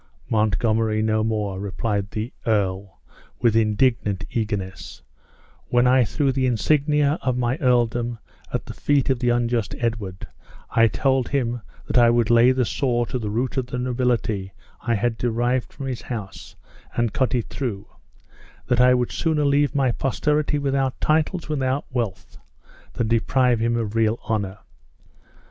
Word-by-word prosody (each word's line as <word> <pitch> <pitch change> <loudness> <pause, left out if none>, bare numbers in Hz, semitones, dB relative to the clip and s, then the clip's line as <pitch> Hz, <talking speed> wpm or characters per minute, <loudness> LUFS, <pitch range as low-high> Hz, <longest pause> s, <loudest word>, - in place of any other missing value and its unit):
"Montgomery 110 +1 +1
no 110 0 +1
more!" 105 -3 -2
replied 100 0 -2
the 110 +4 -4
ear, 100 -3 0 0.5
with 115 -2 +2
indignant 110 -2 +1
eagerness; 105 -4 -4 0.6
"when 120 0 +3
I 125 0 +5
threw 140 +5 0
the 130 0 0
insignia 145 +5 +2
of 130 -1 0
my 125 +2 0
earldom 120 -3 +1 0.3
at - - -3
the - - -7
feet 140 -2 +1
of 130 - 0
the 120 0 +1
unjust 120 -2 0
Edward, 110 -6 -3 0.5
I 115 0 +5
told 130 +1 +1
him 120 -4 -1 0.2
that - - +2
I 120 -1 +6
would 120 -1 +2
lay 120 +2 +6
the 130 -1 +1
saw 120 -1 0
to 125 +2 -3
the 110 -3 -3
root 120 +5 -2
of 130 -2 -1
the 125 - -4
nobility 120 -6 -1 0.3
I 115 - 0
had 115 +2 -1
derived 120 +1 0
from 140 - -7
his 130 -3 -4
house, 105 -6 -7 0.4
and 120 -2 0
cut 130 -1 +1
it 120 - -2
through; 110 -8 -4 0.8
that 125 0 +2
I 125 0 +6
would 125 -1 0
sooner 155 -3 0
leave 145 +1 +2
my 135 -3 +2
posterity 150 +4 0
without 135 -2 -1
titles 160 +3 +1
and - - -13
without 135 -1 -1
wealth, 105 -7 -4 0.5
than 115 - -1
deprive 120 +1 +2
them 115 +1 +1
of 110 -3 -2
real 110 0 +2
honor. 100 -3 -2
120 Hz, 160 wpm, -23 LUFS, 110-130 Hz, 0.8 s, I